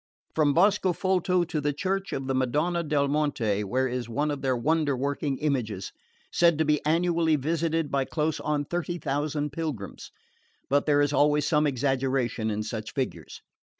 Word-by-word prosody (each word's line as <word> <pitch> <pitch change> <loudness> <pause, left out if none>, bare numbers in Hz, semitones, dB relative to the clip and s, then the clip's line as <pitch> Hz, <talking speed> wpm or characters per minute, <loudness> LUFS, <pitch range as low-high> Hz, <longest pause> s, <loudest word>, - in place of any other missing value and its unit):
From 150 -3 +2
Boscofolto 185 -1 +2
to 155 -2 -2
the 145 0 0
church 195 +5 -2
of 135 - -3
the 135 - -1
Madonna 150 +7 +1
del 150 -3 +1
Monte, 140 -9 0
where 130 +6 0
is 125 -2 -4
one 145 +6 0
of 145 -2 -4
their 130 -2 +1
wonder 150 +1 +1
working 140 +1 -1
images, 120 -10 -2 0.4
said 170 -3 +4
to 160 - +2
be 150 0 +1
annually 165 0 +2
visited 160 +1 -1
by 135 -1 +1
close 155 +1 -1
on 150 -1 -1
thirty 175 +2 -3
thousand 145 0 -2
pilgrims; 145 -10 -5 0.6
but 145 +2 +2
there 145 -1 +4
is 145 0 +1
always 145 +1 +3
some 150 -1 +3
exaggeration 130 -4 0
in 105 0 -2
such 110 0 -5
figures. 135 -3 -4
145 Hz, 165 wpm, -27 LUFS, 130-160 Hz, 0.6 s, said